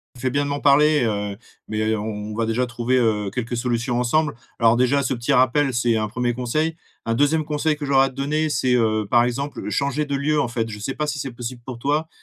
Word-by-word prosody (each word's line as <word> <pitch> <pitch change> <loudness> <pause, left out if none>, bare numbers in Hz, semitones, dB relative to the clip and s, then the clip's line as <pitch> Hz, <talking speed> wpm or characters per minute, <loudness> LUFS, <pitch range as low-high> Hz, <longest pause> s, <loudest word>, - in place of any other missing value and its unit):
Tu 125 - -13
fais 130 - +1
bien 140 +2 0
de 145 - -3
m'en 140 - -1
parler, 150 0 +4
heu, 105 -2 -2 0.3
mais, 110 0 -2
heu, 110 0 +1
on 105 0 -5
on - - -5
va 115 +1 -1
déjà 120 +3 0
trouver, 120 +1 -1
heu, 105 -4 +1
quelques 120 +1 -3
solutions 120 0 -1
ensemble. 150 +5 +1 0.2
Alors 115 0 +4
déjà, 125 +3 +2
ce 130 0 0
petit 120 +4 -1
rappel 135 +2 +3
c'est 120 -1 +1
un 110 -1 -1
1er 120 +2 -1
conseil. 155 +7 -1 0.3
Un 115 - 0
2e 145 +5 +2
conseil 150 +1 0
que 150 -1 -5
j'aurais 135 -1 +4
à - - -2
te 130 - -15
donner 150 +3 0
c'est, 130 -4 +1
heu, 110 -3 +1
par 120 - +5
exemple, 140 +4 -3
changer 140 +2 0
de 140 -1 -1
lieu 150 +2 +1
en 120 - 0
fait. 115 -1 -2
Je 105 - -7
sais 135 +6 -3
pas 150 - -2
si 150 -1 -3
c'est 135 - -4
possible 120 +1 -6
pour 125 -2 -7
toi, 150 +5 0
125 Hz, 255 wpm, -22 LUFS, 115-145 Hz, 0.3 s, par